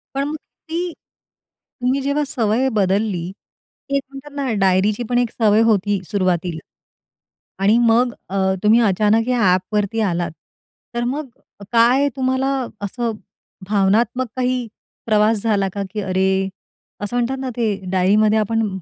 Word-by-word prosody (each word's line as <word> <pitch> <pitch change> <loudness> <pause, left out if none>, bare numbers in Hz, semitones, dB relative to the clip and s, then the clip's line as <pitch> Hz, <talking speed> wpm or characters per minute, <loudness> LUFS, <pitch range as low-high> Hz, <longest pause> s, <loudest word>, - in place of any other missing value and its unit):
पण 280 +2 -1
ती 335 +3 -6 0.9
तुम्ही 255 +3 +1
जेव्हा 280 +2 0
सवय 230 +1 +1
बदलली, 195 -3 0 0.6
एक 280 0 +1
म्हणतात 275 +1 -11
ना 275 -3 -1
डायरीची 195 +4 +2
पण 245 - +1
एक 245 -2 +1
सवय 215 -1 +3
होती 205 -1 +2
एक 190 - -4
सुरुवातीला 180 -4 0 1.0
आणि 210 +4 +5
मग 240 +2 +3 0.2
अ, 195 - -5 0.3
तुम्ही 215 +3 +5
अचानक 210 +4 +2
या 250 -1 +1
ॲपवरती 205 +3 -1
आलात. 175 -4 -1 0.6
तर 240 - 0
मग 275 +4 -2 0.4
काय 245 +4 +4
तुम्हाला 260 0 0 0.4
असं 235 +3 -2 0.6
भावनात्मक 215 +5 +2
काही 250 -1 -1 0.4
प्रवास 215 -1 +3
झाला 205 -4 +1
का, 200 - -3
की 215 - -3
अरे, 190 0 +1 0.5
असं 205 +4 -3
म्हणतात 245 +2 0
ना, 265 -1 -3
ते 220 -4 +1 0.2
डायरीमध्ये 210 +4 +3
आपण 225 +1 0
220 Hz, 135 wpm, -20 LUFS, 200-250 Hz, 1.0 s, आणि